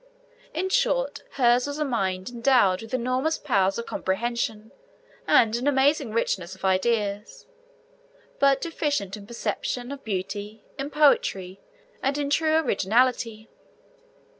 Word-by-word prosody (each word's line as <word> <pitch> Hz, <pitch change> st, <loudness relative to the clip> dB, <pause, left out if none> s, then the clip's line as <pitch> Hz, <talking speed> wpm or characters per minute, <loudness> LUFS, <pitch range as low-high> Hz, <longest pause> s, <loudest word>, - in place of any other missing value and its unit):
In 370 Hz, +4 st, -2 dB
short, -, -, +1 dB
hers 245 Hz, 0 st, +3 dB
was 285 Hz, 0 st, -4 dB
a 305 Hz, -, 0 dB
mind 190 Hz, -7 st, -2 dB
endowed 235 Hz, -6 st, +3 dB
with 225 Hz, -, -10 dB
enormous 255 Hz, +6 st, 0 dB
powers 195 Hz, -8 st, +1 dB
of 235 Hz, -, -4 dB
comprehension, 220 Hz, +2 st, -2 dB, 0.6 s
and 225 Hz, -1 st, +4 dB
an 245 Hz, +4 st, -2 dB
amazing 280 Hz, -1 st, +2 dB
richness 190 Hz, -5 st, -1 dB
of 190 Hz, -, -8 dB
ideas, 205 Hz, +2 st, 0 dB, 0.9 s
but 275 Hz, -1 st, +4 dB
deficient 290 Hz, -, -2 dB
in 200 Hz, -1 st, -12 dB
perception 245 Hz, +2 st, -3 dB
of 280 Hz, -1 st, -8 dB
beauty, 205 Hz, +1 st, -5 dB, 0.2 s
in 275 Hz, +1 st, -3 dB
poetry, 195 Hz, -11 st, +2 dB, 0.4 s
and 275 Hz, +1 st, 0 dB
in 285 Hz, -1 st, -2 dB
true 315 Hz, +1 st, +2 dB
originality. 230 Hz, -3 st, +1 dB
235 Hz, 125 wpm, -25 LUFS, 205-280 Hz, 0.9 s, and